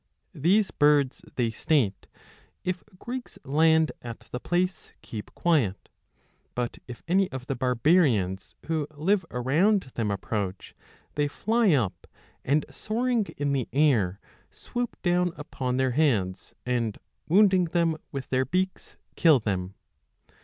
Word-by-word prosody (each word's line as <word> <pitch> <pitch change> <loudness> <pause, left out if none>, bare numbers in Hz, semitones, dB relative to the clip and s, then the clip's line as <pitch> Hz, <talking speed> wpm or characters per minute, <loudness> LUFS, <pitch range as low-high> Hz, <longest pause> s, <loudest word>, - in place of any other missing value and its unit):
These 190 +7 +2
birds, 145 -3 +3
they 120 -3 +1
state, 110 -4 0 0.6
if 185 0 -2
Greeks 245 +5 -6
land 160 +3 +4
at 120 -1 -8
the 125 - -3
place, 180 +5 -1
keep 105 -3 -7
quiet; 140 - +1 0.7
but 125 -1 -3
if 125 -2 -9
any 190 +2 +2
of 130 -1 -6
the 135 - -2
barbarians 125 - +2
who 160 -3 -1
live 185 +6 +2
around 150 - +2
them 110 -3 -1
approach, 100 -1 -3 0.4
they 145 0 +1
fly 220 +5 +2
up, 115 -10 -1 0.4
and 145 +3 +2
soaring 235 0 0
in 145 0 0
the 130 -4 -1
air 115 -10 +2 0.3
swoop 245 -1 -5
down 175 -1 +2
upon 130 -3 -3
their 130 -1 +2
heads, 115 -10 0
and, 120 -4 -1 0.3
wounding 190 0 +5
them 170 -1 +1 0.2
with 135 -2 -5
their 130 0 +2
beaks, 185 +7 -2 0.2
kill 160 -6 +5
them. 95 -3 -3
145 Hz, 130 wpm, -27 LUFS, 120-180 Hz, 0.7 s, wounding